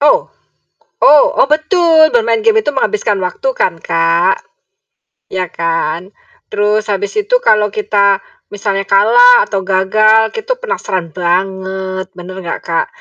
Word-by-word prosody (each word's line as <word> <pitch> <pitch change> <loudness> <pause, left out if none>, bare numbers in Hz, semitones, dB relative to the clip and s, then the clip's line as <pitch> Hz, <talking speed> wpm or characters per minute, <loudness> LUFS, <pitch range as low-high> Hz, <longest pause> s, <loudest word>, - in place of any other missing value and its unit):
Ow, 295 +12 +4 0.8
oh 295 0 +6 0.2
oh - - +3
betul 320 0 +3
bermain 465 -1 +2
game 440 -1 +3
itu 295 - -1
menghabiskan 265 - -1
waktu 225 +9 -4
kan, 180 - +1
Kak, 170 +3 +1 1.0
iya 185 -1 -2
kan? 165 +1 -3 0.4
Terus 210 +1 -1
habis 205 0 -2
itu 425 +5 +1
kalau 210 -1 +3
kita 200 -1 0 0.3
misalnya 200 -1 -2
kalah 485 - +5
atau 195 - -3
gagal 215 +4 +2
itu - - -3
penasaran 185 - -4
banget, 190 +1 -3
benar 185 +1 -9
enggak, 170 -2 -5
Kak? 165 -1 -1
200 Hz, 130 wpm, -13 LUFS, 185-295 Hz, 1.0 s, oh